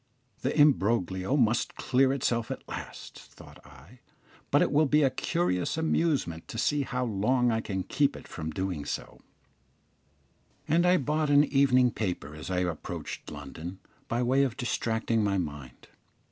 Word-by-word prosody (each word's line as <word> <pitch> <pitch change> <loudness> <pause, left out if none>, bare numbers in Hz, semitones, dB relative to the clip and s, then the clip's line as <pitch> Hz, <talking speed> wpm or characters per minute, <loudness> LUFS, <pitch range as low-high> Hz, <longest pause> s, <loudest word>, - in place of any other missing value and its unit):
"The - - -1
imbroglio 115 - +3
must 115 -3 +1
clear 130 0 +2
itself 120 -4 -1
at - - -6
last," - - -8
thought - - -15
I, 85 - -17 0.5
"but - - +4
it - - 0
will 150 +1 +4
be 150 +2 +4
a 135 - +3
curious 130 - -1
amusement 155 - 0
to - - -7
see 145 +5 +1
how 125 -2 -2
long 120 +3 +1
I 110 0 0
can 95 -4 -3
keep 140 +7 +1
it - - -11
from 80 -1 -5
doing 90 -2 -3
so;" - - -6 1.5
and 170 +3 +3
I 180 +1 +5
bought 150 +1 0
an 145 0 +6
evening 130 -3 +3
paper 90 -10 -4
as 75 +3 -8
I 90 -1 0
approached 85 -4 -5
London, 80 +5 -8 0.3
by 120 +1 0
way 130 +3 +3
of 130 -3 0
distracting 115 -2 0
my 100 -1 +1
mind. 70 -8 -6
120 Hz, 160 wpm, -28 LUFS, 90-140 Hz, 1.5 s, an